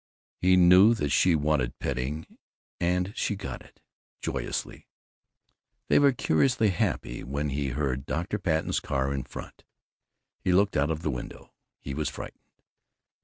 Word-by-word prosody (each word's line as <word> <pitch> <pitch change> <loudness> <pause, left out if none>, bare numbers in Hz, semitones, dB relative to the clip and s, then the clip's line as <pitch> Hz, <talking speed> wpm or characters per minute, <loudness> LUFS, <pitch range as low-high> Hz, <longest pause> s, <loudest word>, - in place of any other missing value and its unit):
He 90 +1 +4
knew 90 +5 +7
that 75 -10 -2
she 90 +2 +4
wanted 75 -4 0
petting, 70 +4 -3 0.5
and 90 +3 0
she 105 - -1
got 65 -10 -6
it, - - -19 0.4
joyously. - - -4 1.0
They - - +5
were 140 -1 +5
curiously 120 - +2
happy - - -2
when 70 +3 -2
he 70 0 -1
heard 65 0 -2
Dr. 90 +6 -2
Patten's 80 -4 0
car 70 0 -1
in 70 -1 -3
front. - - -10 0.8
He 90 - +1
looked 100 +2 +3
out 70 +2 +2
of 80 0 -3
the 75 - 0
window. 60 -2 -8 0.3
He 70 - -6
was 75 +1 -1
frightened. - - -10
75 Hz, 145 wpm, -27 LUFS, 70-90 Hz, 1.0 s, knew